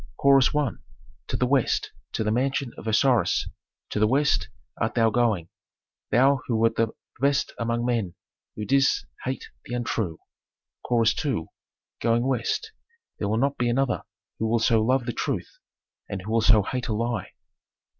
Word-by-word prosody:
Chorus 135 -1 +5
I. 150 -3 +2 0.6
"To - - -2
the 125 - +2
West, 130 -1 +1 0.2
to - - -1
the 105 - 0
mansion 135 +2 0
of - - -9
Osiris, 120 +2 +3 0.4
to - - -1
the 110 - +4
West 140 +5 +2 0.3
art 110 - 0
thou 115 -2 +4
going, 105 -8 +1 0.6
thou 130 +4 +4
who 120 - 0
wert 115 0 +2
the 115 - +2 0.3
best 140 +1 +1
among 115 0 -1
men, 115 -8 -1 0.4
who 105 - -4
didst 135 +2 +3 0.2
hate 130 +1 -4
the 120 - -5
untrue." 110 -8 -2 0.7
Chorus 115 -2 +3
II. 125 - -2 0.5
"Going 120 +1 +2
West! 130 - -1 0.5
There 100 - -1
will 110 - +1
not 140 +4 0
be 120 -1 +2
another 135 +2 +1 0.4
who 110 - 0
will 115 +1 +2
so 115 -1 +3
love 125 +2 +2
the 120 - -2
truth, - - -3 0.5
and 95 -2 -4
who 110 - -5
will 115 0 +3
so 110 -2 +5
hate 125 +4 -3
a 110 - -1
lie." 115 -1 -2
120 Hz, 165 wpm, -25 LUFS, 110-130 Hz, 0.7 s, Chorus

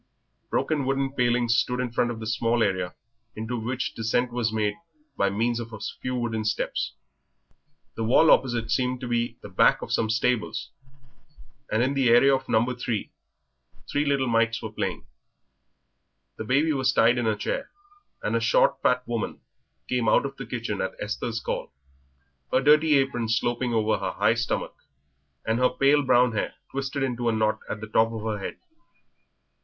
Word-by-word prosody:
Broken 145 -4 0
wooden 135 0 0
palings 120 -2 +2
stood 125 +2 0
in 125 -2 -2
front 120 +1 +1
of 115 -2 -5
the 110 - -6
small 115 +1 +1
area 95 -3 -1 0.4
into 110 +3 -4
which 120 +3 -3
descent 120 +2 0
was 120 -2 0
made 105 -1 0 0.4
by 100 -4 +2
means 115 +4 0
of 115 -1 -7
a 110 - -7
few 125 +4 -4
wooden 115 -3 -2
steps. 110 0 -2 1.0
The 115 - -3
wall 130 +8 +5
opposite 120 -3 +2
seemed 125 -1 0
to 125 - -4
be 120 -1 -1
the - - -7
back 95 - +3
of - - -7
some 110 - +1
stables, 115 +1 -1 1.0
and 110 +2 +2
in 135 +2 +1
the 135 -3 +2
area 130 +4 +6
of 130 0 -6
No. 110 +1 +3
3 120 -3 -3 0.8
three 145 - +1
little 140 -2 +1
mites 115 -1 +1
were 110 - -6
playing. 100 -8 -3 1.3
The 110 - -5
baby 145 +7 +2
was 130 -2 +2
tied 120 0 +4
in 120 - 0
a 110 - +2
chair, 275 - -3 0.5
and - - 0
a - - +3
short - - +3
fat 125 0 +1
woman 115 -2 -3 0.5
came 125 -3 +1
out - - +4
of - - -5
the - - -8
kitchen - - -3
at - - -3
Esther's 115 - -3
call, - - -4 0.8
her - - +4
dirty 150 +2 +5
apron 135 -4 0
sloping 120 +2 0
over 110 -1 +1
her - - -3
high - - +3
stomach, - - -2 0.7
and 110 +1 0
her 125 - +4
pale 140 +2 +3
brown 125 -2 +4
hair 110 - -3 0.2
twisted 135 0 -3
into 120 -2 -1
a - - +2
knot 110 -1 +1
at 105 - -4
the 110 - -6
top 110 +1 +2
of 110 -2 -6
her 110 -2 -2
head. - - -6
120 Hz, 180 wpm, -26 LUFS, 110-130 Hz, 1.3 s, area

